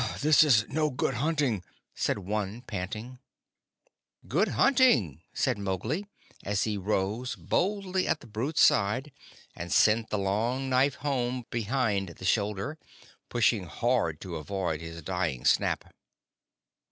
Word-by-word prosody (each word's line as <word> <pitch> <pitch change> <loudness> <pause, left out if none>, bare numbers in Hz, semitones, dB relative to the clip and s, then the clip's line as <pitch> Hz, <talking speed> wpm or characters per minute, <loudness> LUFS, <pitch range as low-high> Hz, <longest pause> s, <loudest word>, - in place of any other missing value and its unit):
"This 155 +1 +6
is 115 -8 +4
no 155 +1 0
good 135 0 -1
hunting," 135 - 0 0.3
said - - -1
one, 105 +3 -3
panting. 110 +4 -6 1.1
"Good - - +2
hunting!" 125 - +3
said - - 0
Mowgli, 110 - -2 0.4
as 100 0 0
he 110 -2 -1
rose 105 +5 -1
boldly 190 -1 -1
at 160 - +1
the - - -14
brute's 120 +8 -1
side, 115 +9 +3 0.4
and 85 0 -6
sent 110 +1 +4
the 105 - -1
long 115 +7 -1
knife 130 +2 +3
home 125 -3 -2
behind 110 -4 0
the 90 +2 -10
shoulder, 105 +8 0 0.5
pushing 115 -4 +2
hard 115 -9 0
to 90 -3 -5
avoid 80 0 -3
his 80 0 -8
dying 85 -9 -2
snap. - - +1
110 Hz, 130 wpm, -28 LUFS, 95-130 Hz, 1.1 s, This